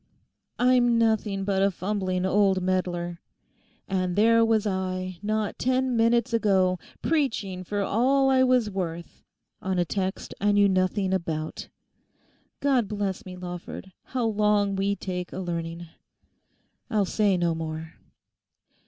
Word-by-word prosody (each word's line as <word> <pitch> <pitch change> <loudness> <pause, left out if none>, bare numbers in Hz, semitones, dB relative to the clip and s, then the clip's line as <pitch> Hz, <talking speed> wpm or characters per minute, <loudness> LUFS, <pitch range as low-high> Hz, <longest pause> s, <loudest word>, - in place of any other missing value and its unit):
'I'm 245 -1 +4
nothing 220 -3 +1
but 195 -1 +1
a 195 - +4
fumbling 185 -1 -2
old 195 0 +3
meddler. 180 -2 -2 0.7
And 185 -2 -1
there 230 +2 +5
was 225 -1 +2
I, 185 -2 -3
not 215 0 -2
ten 255 0 +1
minutes 235 +1 +2
ago, 190 -5 +2 0.2
preaching 225 - -1
for 205 +3 -2
all 260 +7 +2
I 265 -1 +4
was 250 -4 +2
worth 170 -3 -5 0.4
on 190 -1 -1
a 175 - +2
text 190 +2 -3
I 205 0 +3
knew 205 0 +5
nothing 190 0 +1
about. 160 -4 -3 0.9
God 260 -6 +2
bless 205 0 -3
me, 180 0 -8
Lawford, 180 +1 -7
how 250 -3 -2
long 210 -2 +2
we 200 +1 0
take 180 -2 -5
a - - -7
learning. 170 -2 -4 1.0
I'll 210 -4 +2
say 200 -1 +2
no 170 -1 +1
more. 160 0 -5
195 Hz, 135 wpm, -26 LUFS, 185-220 Hz, 1.0 s, there